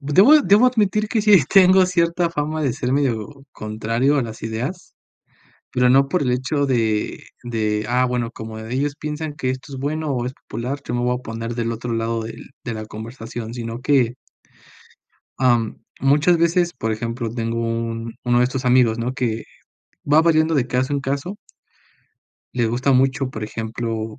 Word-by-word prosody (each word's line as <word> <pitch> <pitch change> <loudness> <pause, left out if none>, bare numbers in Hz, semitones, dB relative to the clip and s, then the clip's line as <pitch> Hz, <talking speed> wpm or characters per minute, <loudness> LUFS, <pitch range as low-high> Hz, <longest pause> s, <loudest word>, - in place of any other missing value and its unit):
debo 195 - +6
debo 210 +3 +5
admitir 215 -4 +1
que 220 0 0
sí 205 -8 +6
tengo 185 -1 +6
cierta 170 -1 +1
fama 155 0 -2
de 135 -4 +1
ser 125 - -3
medio 130 -6 0 0.2
contrario 115 +6 0
a - - +2
las 110 -1 -9
ideas, 120 +11 -4 0.8
pero 125 0 +3
no 135 +2 +5
por 180 +6 0
el 130 -3 +1
hecho 130 +3 0
de 115 -5 0 0.2
de, 110 -2 -1
ah, 125 +1 +3
bueno, 125 -2 -2
como 110 -2 -8
de 110 +2 -6
ellos 145 +2 -1
piensan 150 0 -4
que 130 - -2
esto 130 +2 -5
es - - -5
bueno, 150 +2 -2
o 125 -2 -1
es 125 - -3
popular, 130 +2 -5
yo 120 - -4
me 120 - 0
voy 125 0 +1
a - - -16
poner 115 0 -5
del 115 -1 -2
otro 120 +1 -5
lado 115 0 -1
del 115 +3 -9
de 120 - -4
la 110 0 -6
conversación, 115 +1 -7
sino 115 0 -5
que 125 -3 +2 1.3
am, 120 -4 +2 0.2
muchas 150 +5 +4
veces, 170 +1 +2
por 110 -3 -2
ejemplo, 115 +2 -3
tengo 115 0 -3
un 115 0 -3
uno 120 0 +3
de 125 - +4
estos 130 +1 -3
amigos, 125 -2 +4
¿no?, 120 +2 -2
que 115 -3 -2 0.7
va 150 +2 +7
variando 160 -1 +3
de 130 -4 +2
caso 130 +2 -1
en 140 - 0
caso 140 +8 -3 1.2
le 120 -2 +1
gusta 125 +4 +1
mucho, 130 0 +2
por 110 -3 -5
ejemplo, 110 0 -4
125 Hz, 180 wpm, -21 LUFS, 115-145 Hz, 1.3 s, va